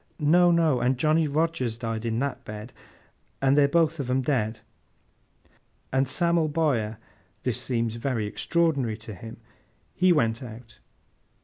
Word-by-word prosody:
'No, 175 +3 +4
no! 165 -6 +3
and 125 +1 +1
Johnny 155 +3 +2
Rogers 150 -6 -1
died 115 -1 -4
in 115 -1 -1
that 140 +2 -2
bed, 105 +3 -8 0.7
and—and—they're 140 +1 +4
both 165 +1 +2
on 130 -3 -3
'em 130 +1 +2
dead—and 130 +2 -5
Sam'l 170 +2 +1
Bowyer;' 135 -9 0 0.5
this 125 -1 -1
seems 115 -3 -1
very 115 -3 -1
extraordinary 140 -1 0
to 110 -1 -9
him; 110 +4 -10 0.6
'he 185 0 +3
went 115 -8 +2
out! 115 -1 -11
130 Hz, 130 wpm, -26 LUFS, 115-155 Hz, 0.7 s, No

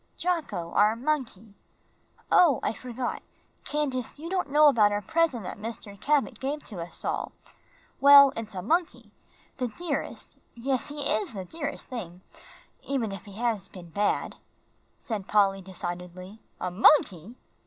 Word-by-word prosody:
"Jocko, 320 - -2
our 210 +2 +4
monkey. 235 -6 -3 0.8
Oh, 320 -9 +6
I - - 0
forgot, 250 +1 -5 0.4
Candace, 275 -5 -2
you 330 +4 -7
don't 370 -5 -1
know 300 +2 +6
about 215 -7 +5
our 205 0 -2
present 325 -8 +1
that 180 - -7
Mr. 215 -2 -7
Cabot 290 -1 +1
gave 285 +3 -3
to 190 -5 -7
us 170 - -7
all. - - -2 0.7
Well, 280 -1 +9
it's 220 -2 -6
a 180 - -4
monkey 335 - -1 0.5
the 255 -2 -1
dearest, 285 +5 -5 0.2
yes, 255 +1 -1
he 295 0 -5
is 215 -5 0
the 190 -3 -6
dearest 290 - -5
thing, 185 -8 -7 0.6
even 255 -6 -2
if 195 -2 -8
he 200 - -11
has 220 -3 -1
been 175 -2 -12
bad," 205 +4 -1 0.6
said 210 -5 -5
Polly, 195 -2 +3
decidedly. 180 +2 -7 0.2
"A 180 - -3
monkey!" 200 - +4
230 Hz, 145 wpm, -27 LUFS, 195-285 Hz, 0.8 s, Well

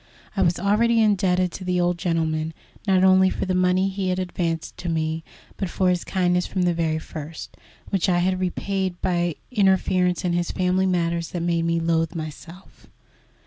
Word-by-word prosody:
I 195 - +1
was 175 -2 +2
already 225 +5 +2
indebted 185 -4 +2
to 190 - -7
the 180 -1 0
old 175 0 +1
gentleman, 160 -2 -1 0.3
not 190 -1 +4
only 190 0 +6
for - - -3
the 185 - -1
money 185 +1 +2
he 195 -1 -2
had 180 - 0
advanced 175 -3 -3
to 175 - -4
me, 160 0 -1 0.3
but 195 - -2
for 185 0 +1
his 180 -1 -1
kindness 180 -1 +1
from 185 - -1
the 175 -1 +2
very 165 -1 0
first, 160 0 -8 0.4
which 195 -2 +1
I 175 - +3
had 185 +1 +1
repaid 185 0 -2
by 185 - +1
an 175 -2 0 0.2
interference 185 -4 +2
in 175 - +1
his 175 0 0
family 185 0 +1
affairs 170 -2 0
that 175 -2 -4
made 170 -1 +1
me 170 0 +1
loathe 165 0 0
myself. 165 +3 -9
180 Hz, 185 wpm, -23 LUFS, 170-185 Hz, 0.4 s, only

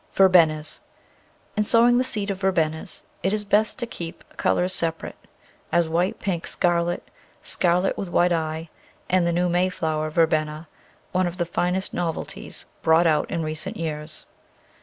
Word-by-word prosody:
Verbenas 165 -5 +5 0.8
IN 210 - +2
sowing 235 +3 +4
the - - +3
seed 210 -5 0
of 190 - -5
Verbenas 165 -2 0 0.2
it 190 +3 0
is 210 -1 0
best 210 +1 +2
to 245 - -2
keep 170 -8 -8
colours 180 +1 +1
separate, 165 -3 -4 0.4
as 170 -1 +3
white, 175 +4 0
pink, 175 -4 -2
scarlet, 175 0 0 0.4
scarlet 180 +1 +1
with 195 - -4
white 175 +1 +3
eye, 160 -1 -2 0.4
and 180 -2 +3
the - - +2
new 175 +1 +1
Mayflower 170 -3 0
Verbena 155 0 +1 0.2
— - - -34
one 185 0 +1
of 175 +1 -5
the 175 - 0
finest 180 +3 -1
novelties 170 -2 -4 0.2
brought 160 +2 +4
out 155 -2 +2
in 165 - -2
recent 155 0 -4
years. 155 -1 -5
175 Hz, 155 wpm, -24 LUFS, 160-185 Hz, 0.8 s, Verbenas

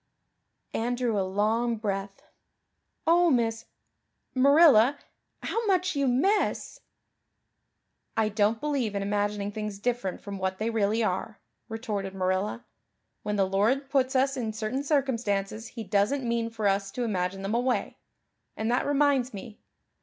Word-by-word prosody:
Anne 240 +2 -1
drew 240 -4 0
a - - +2
long 215 +5 0
breath. 195 -2 -4 0.8
"Oh, 345 +1 +5
Miss 230 -4 +1 0.7
Marilla, 280 -2 +6 0.5
how 460 - -1
much 370 -2 +1
you 280 -1 +1
miss!" 380 - +1 1.4
"I 220 -1 +3
don't 215 +1 +1
believe 270 -8 -1
in 200 - -1
imagining 205 0 -1
things 210 -1 -5
different 230 -3 -2
from 200 -1 -7
what 190 0 -2
they 220 +3 -1
really 220 +1 +1
are," 210 +2 -2 0.3
retorted 210 -4 -4
Marilla. 190 +4 -1 0.6
"When 210 - -2
the 195 -1 +3
Lord 225 +9 +1
puts 265 -1 +1
us 270 +1 +2
in 225 -4 -3
certain 220 +5 -3
circumstances 230 -7 -1
He 230 -1 -7
doesn't 210 +7 +1
mean 235 -1 0
for 220 -2 -1
us 195 0 +1
to 250 - -2
imagine 195 -3 -2
them 195 +2 -2
away. 245 +2 0 0.6
And 220 +2 -1
that 245 - +1
reminds 280 -4 +2
me. 210 +2 -9
225 Hz, 140 wpm, -27 LUFS, 200-255 Hz, 1.4 s, Marilla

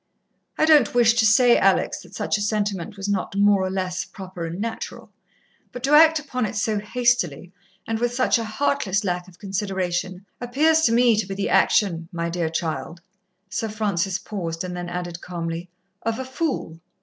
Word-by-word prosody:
I - - +3
don't 300 -6 +5
wish 235 -2 +5
to 230 -2 +3
say, 240 +2 +5
Alex, - - +2
that - - -14
such - - -1
a 210 - -2
sentiment 205 -3 -2
was 195 0 -4
not 200 -1 -2
more 200 -1 +4
or 185 - -1
less 185 -1 -2
proper 185 -4 -7
and 170 +3 -6
natural, 225 +1 -5 0.6
but 245 - -8
to 275 - 0
act 320 +1 +7
upon 255 -6 -2
it 210 - -7
so 210 +1 0
hastily, 210 - 0 0.3
and 225 -1 -2
with 240 0 0
such 250 -1 +2
a - - -2
heartless 215 -3 0
lack 180 -2 -2
of 180 -1 -17
consideration, 190 -2 -3 0.2
appears 305 +6 +3
to - - +3
me 235 0 +4
to 210 -3 -1
be 195 - -5
the 200 - -2
action, 170 -5 +2
my 170 -1 -3
dear 170 -2 -1
child" 165 +1 -4 0.5
Sir 220 +3 -3
Francis 200 -3 -1
paused, 170 -5 -5
and 180 -1 -5
then 175 0 -5
added 175 -1 -5
calmly 170 0 -5 0.3
"of 225 0 -2
a 260 - -4
fool. 260 - -3
200 Hz, 185 wpm, -23 LUFS, 180-235 Hz, 0.6 s, act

